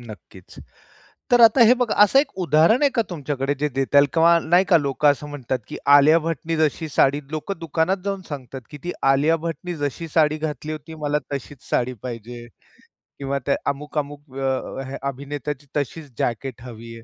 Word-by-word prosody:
नक्कीच, 105 -5 -13 0.7
तर 245 -1 +6
आता 230 +2 +7
हे 240 - +7
बघा, 245 -3 -1
असं 240 +6 +5
एक 275 0 -1
उदाहरण 165 - +3
आहे 290 - +4
का 235 - +3
तुमच्याकडे, 145 -4 -2
जे 150 +1 0
देता 135 +1 0
येईल 140 0 +6
किंवा 170 +1 +5
नाही 175 +4 +3
का, 175 - +7
लोकं 145 0 0
असं 150 +1 -6
म्हणतात, 130 -3 -3
की - - -7 0.2
आलिया 150 +3 +6
भट्टने 165 0 -3
जशी 155 +1 0
साडी 140 0 +2
लोकं 160 +6 -4
दुकानात 165 +3 0
जाऊन 195 -1 -2
सांगतात, 135 -2 -7
की 145 - -9
ती 175 - -3 0.2
आलिया 150 +4 +2
भट्टने 175 +1 -4
जशी 145 +3 -4
साडी 155 -1 +2
घातली 155 -1 -4
होती, 155 +1 -8
मला 145 0 +1 0.2
तशीच 140 0 -7
साडी 125 +1 0
पाहिजे 120 -1 -7 0.7
किंवा 140 0 -2
त्या 140 - +2
अमुक-अमुक 145 0 -4 0.2
अ, 135 0 -2
अ, 135 +1 -6
अभिनेत्याची 140 +1 -5
तशीच 145 +3 -3
जॅकेट 120 +1 -3
हवी 115 -2 -10
आहे, 115 - -14
145 Hz, 180 wpm, -22 LUFS, 135-165 Hz, 0.7 s, आता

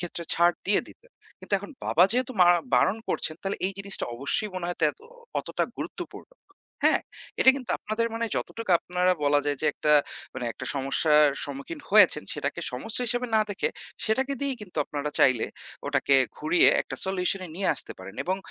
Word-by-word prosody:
ক্ষেত্রে 175 -1 -5
ছাড় 175 +1 +4
দিয়ে 205 - +4
দিতেন। - - -18 0.3
কিন্তু - - -9
এখন 200 - -10 0.2
বাবা 170 - +4
যেহেতু 255 +1 0
মার 175 0 +8 0.2
বারণ 200 - +3
করছেন 155 - -1
তাহলে 195 +1 -2
এই 195 - -1
জিনিসটা 195 0 -2
অবশ্যই 140 - 0
মনে 180 -2 -3
হয় 175 - -4
তেত 150 - +3 0.4
অতটা - - -2
গুরুত্বপূর্ণ' - - -7 0.5
হ্যাঁ, - - +4 0.4
এটা 265 - +9
কিন্তু 255 -3 -6
আপনাদের 225 +2 -1
মানে 230 0 -1
যতটুকু 230 -4 -4
আপনারা 180 +1 +1
বলা 145 0 +4
যায় 145 -2 0
যে, - - +2
একটা 150 - +1 0.4
মানে 130 -2 -4
একটা - - -8
সমস্যার 150 +3 +3 0.2
সম্মুখীন 140 - -7
হয়েছেন, - - +6
সেটাকে - - -3
সমস্যা 225 +3 -3
হিসেবে 245 +2 0
না - - +5
দেখে 200 - -1 0.4
সেটাকে 265 +5 +1
দিয়েই 275 -2 -1
কিন্তু 180 -5 -12
আপনারা 150 0 -4
চাইলে 130 -4 +4 0.4
ওটাকে 140 - +2 0.2
ঘুরিয়ে 160 +4 +4
একটা - - -7
solution 190 0 0
এ - - -13
নিয়ে 195 - 0
আসতে - - -5
পারেন। 95 +2 -10
এবং 185 +2 0
180 Hz, 180 wpm, -26 LUFS, 150-220 Hz, 0.5 s, এটা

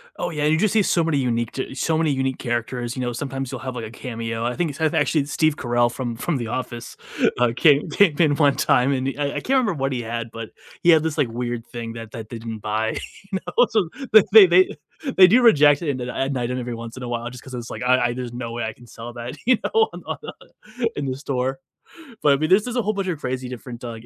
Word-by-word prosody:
Oh, - - -3
yeah, 150 -3 -2
you 155 +1 +3
just 210 +4 +2
see 220 - +4
so 175 -3 +2
many 160 -3 +1
unique 120 -3 0
t 130 0 -5
so 160 +2 0
many 160 -2 +2
unique 135 -1 -1
characters, 120 0 -3
you 130 - -4
know, 120 -1 -2
sometimes 135 0 -4
you'll - - -5
have 130 -1 -5
like 115 - -4
a 110 - -9
cameo. 115 -2 -5
I 125 0 -1
think 170 -4 -1
it's 140 - -12
actually 155 -2 +2
Steve 155 +1 +1
Carell 120 -1 +1
from 120 -2 -4
from 145 +6 -2
the 120 -3 -4
Office. 120 -1 -5 0.4
uh, 120 -1 +3
came, 150 +2 +4
came 170 0 +3
in 150 -4 +4
one 145 -2 +3
time 125 +2 +3
and 130 0 -1
i 145 - +1
I - - 0
can't - - -13
remember 255 -7 +3
what 135 -3 -2
he 125 -2 -2
had, 115 0 -5
but 115 -1 -7 0.3
he 175 - +3
had 160 -2 +6
this 160 -1 -2
like 145 -5 +2
weird 120 0 -4
thing 115 -1 -6
that 115 -2 -9
that 110 -2 -8
they 120 - -6
didn't 115 -1 -6
buy, 110 +2 -2 0.3
you 190 - -1 0.2
know, 245 0 +6
so 210 -8 +1 0.4
they, 210 -2 +10
they, 180 +2 +4 0.4
they 185 -1 +9
do 240 +7 +5
reject 145 -10 +6
it 165 - -2
in 140 - -1
that 125 -1 -5
at 135 +2 -2
night 120 -2 -2
and 125 - -2
every 120 -1 -4
once 115 0 -8
in 130 - -7
a - - -4
while 120 0 -3
just 125 0 -11
'cause 130 - -11
it's, 120 -1 -6
like, - - -6
"I 130 +1 +4
I, 120 - -2
there's 125 -1 -6
no 120 -1 -5
way 120 - -3
I 110 - -3
can 120 +2 -18
sell 115 +1 -9
that, 120 +2 -7
you 250 0 +4
know, 445 0 +2 1.1
in 145 - -3
the 130 -1 -3
store, 135 -2 -2 0.6
but 145 - +5
I - - +4
mean, 155 +2 -1
this 205 +5 +4
is 245 - -4
a 245 - +2
whole 215 0 -1
bunch 195 -2 -3
of 170 -5 -2
crazy 130 -2 -3
different 125 -1 -8
d 125 - -6
uh, - - -5
130 Hz, 265 wpm, -22 LUFS, 120-155 Hz, 1.1 s, they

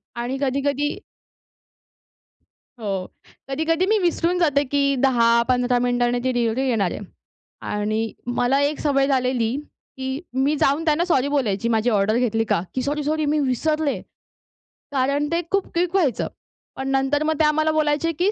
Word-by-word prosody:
आणि 245 +3 -3
कधी-कधी 280 +2 0 1.9
हो. 215 -3 -4 0.6
कधी-कधी 320 +5 +1
मी 435 +3 +3
विसरून 350 0 +1
जाते, 290 -4 +3
की 280 0 +1
10 235 -2 +4
15 250 0 +2
मिनिटांनी 245 0 +1
ती 260 - +1
डिलिव्हरी 240 +2 0
येणार 200 -7 +1
आहे. - - -5 0.6
आणि 215 +2 -2 0.2
मला 265 +3 +2
एक 285 +1 0
सवय 275 -2 +2
झालेली, 255 -3 +1 0.4
की 265 +1 -4
मी 265 +4 +1
जाऊन 290 +4 +2
त्यांना 315 +2 +2
सॉरी 285 -6 +1
बोलायची. 235 -6 0
माझी 225 +1 +2
ऑर्डर 210 +1 +2
घेतली 225 -2 +1
का? 195 - +1
की 260 - -1
सॉरी-सॉरी 300 +2 -1
मी 300 +1 +1
विसरले. 290 +3 0 0.9
कारण 280 +2 +1
ते 335 - +2
खूप 395 -1 0
क्विक 345 +1 0
व्हायचं. 315 - +1 0.5
पण 265 0 -4
नंतर 270 +2 +1
मग 315 0 +1
ते - - +5
आम्हाला 310 +1 +2
बोलायचे 305 +1 +1
की 360 +6 +1
275 Hz, 150 wpm, -22 LUFS, 245-300 Hz, 1.9 s, ते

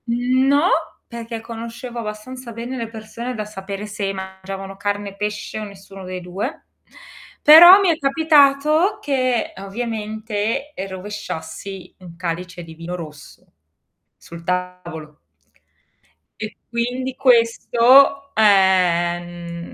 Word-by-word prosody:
Mhmm, 250 +3 +1
no, 290 +6 +4 0.4
perché 230 -1 -7
conoscevo 235 +1 -7
abbastanza 235 +3 -7
bene 240 +3 -6
le 230 -2 -4
persone 230 +2 -7
da 215 -1 -4
sapere 200 0 -7
se 205 -1 -3
mangiavano 190 0 -7
carne, 205 0 -3
pesce 210 +1 -4
o - - -5
nessuno 195 -1 -11
dei 185 0 -6
2, 195 - -5 0.8
però 345 +6 +10
mi 390 -3 +2
è 325 - +2
capitato 305 +4 +3
che, 255 -4 0
ovviamente, 220 +4 -4
e 195 -5 -5
rovesciassi 190 -1 -7
un 175 -2 -12
calice 175 +1 -5
di 165 -1 -11
vino 165 +2 -6
rosso 155 -4 -11 0.7
sul 170 0 -12
tavolo. 175 -4 -5 1.2
E 215 0 -6
quindi 250 +2 -2
questo 255 +3 +4
è 220 - +1
ehm 175 -3 +2
210 Hz, 115 wpm, -20 LUFS, 190-250 Hz, 1.2 s, però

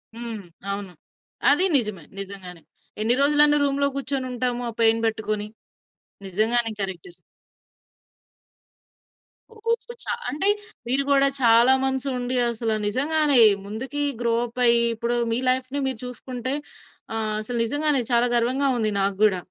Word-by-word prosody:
హ్మ్. 230 -3 -6 0.3
అవును. 200 -2 -5 0.6
అది 295 +7 +5
నిజమే. 210 -9 -2 0.2
నిజంగానే. 185 -3 -6 0.4
ఎన్ని 235 +3 +3
రోజులని 295 +1 +5
రూమ్‌లో 280 0 0
కూర్చొనుంటాము. 255 -3 -3
ఆ - - -5
పెయిన్ 225 0 +3
పెట్టుకొని. 215 -1 -3 0.8
నిజంగానే 225 +4 +3
కరెక్ట్. 180 -3 -4 2.4
ఓహ్! 460 +1 -2 0.3
చా - - -2 0.2
అంటే 385 +7 0 0.4
మీరు 270 +3 +2
కూడా 275 0 +4
చాలా 235 +2 +5
మంత్స్ 265 0 -2
ఉండి 250 +1 -3
అసలు 225 -1 -2
నిజంగానే 285 +3 +2 0.3
ముందుకి 260 +8 -3 0.2
గ్రో 235 -1 0
అప్ 240 +1 -10
అయ్యి, 235 0 +5
ఇప్పుడు 235 +2 -2 0.2
మీ 230 - 0
లైఫ్‌ని 260 +2 -1
మీరు 255 -4 -4
చూసుకుంటే, 250 +1 -5 0.6
ఆహ్, 215 -1 -2
అసలు 240 +2 -5
నిజంగానే 290 +1 +1
చాలా 240 +1 +3
గర్వంగా 260 +4 +1
ఉంది 215 -1 0
నాకు 195 0 -1
కూడా. 190 -4 +1
240 Hz, 125 wpm, -23 LUFS, 220-275 Hz, 2.4 s, అది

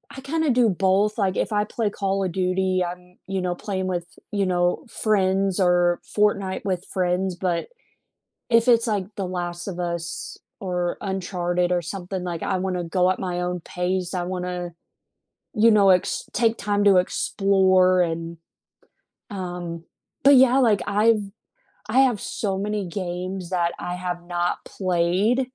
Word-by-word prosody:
I 270 - -8
kinda 305 +1 0
do 240 -2 +4
both, 195 +3 +2
like, 195 -3 +1
if - - -1
I 210 0 +2
play 215 0 -2
Call 195 -1 -1
of 185 - -1
Duty, 185 0 0
I'm, 180 +1 -9
you 190 0 -2
know, 180 -1 -1
playing 190 0 -3
with, 175 -2 -2 0.3
you 200 -2 0
know, 175 -1 0
friends 195 -3 +1
or 175 -1 +3
Fortnite 200 -2 +1
with 185 -2 -2
friends, 185 0 -1
but 175 -1 -2 0.8
if 230 +1 +4
it's 235 0 +5
like 205 -4 -1
The 195 - -2
Last 175 -1 -4
of 180 -3 -5
Us 170 -1 -4 0.2
or 180 -2 -2
Uncharted 180 -2 -1
or 175 - +2
something, 185 +2 -5
like, 175 -2 -4
I 190 - 0
wanna 180 -1 -2
go 180 +2 +2
at 185 - -1
my 180 -2 -3
own 180 0 -2
pace, 180 +2 -2
I 180 -1 -2
wanna, 180 -1 -4 0.8
you 225 +2 +5
know, 200 -2 +5
ex 180 -1 +2
take 230 -1 +2
time 205 0 0
to 200 -2 +6
explore 185 0 +3
and, 165 0 -3 0.9
um, 175 -4 -6 0.4
but 280 +1 +8
yeah, 260 0 +6
like 225 -7 +3
I've 215 +2 +3 0.7
I 255 +5 +4
have 245 -6 +2
so 195 -3 -2
many 205 0 -2
games 180 0 -4
that 175 -2 0
I 175 0 -4
have 180 -1 -4
not 175 0 -2
played. 190 +7 +1
185 Hz, 160 wpm, -23 LUFS, 180-205 Hz, 0.9 s, but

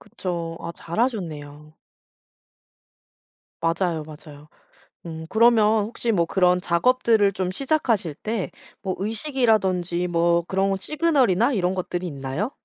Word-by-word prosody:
그쵸. 170 -5 -5
아 170 - -6
잘하셨네요. 160 - -4 1.9
맞아요, 165 -1 0
맞아요. 150 -1 -13 0.6
음 160 -1 -7
그러면 220 0 +4
혹시 230 +1 -2
뭐 170 -4 +2
그런 180 0 +3
작업들을 210 +3 +3
좀 185 -1 -2
시작하실 230 - 0
때 215 +4 -3 0.3
뭐 190 -2 -2
의식이라든지 200 - 0
뭐 170 0 +2
그런 195 +2 0
시그널이나 270 - +2
이런 185 -5 0
것들이 180 -1 -3
있나요? 140 - -3
185 Hz, 265 characters per minute, -23 LUFS, 170-220 Hz, 1.9 s, 그러면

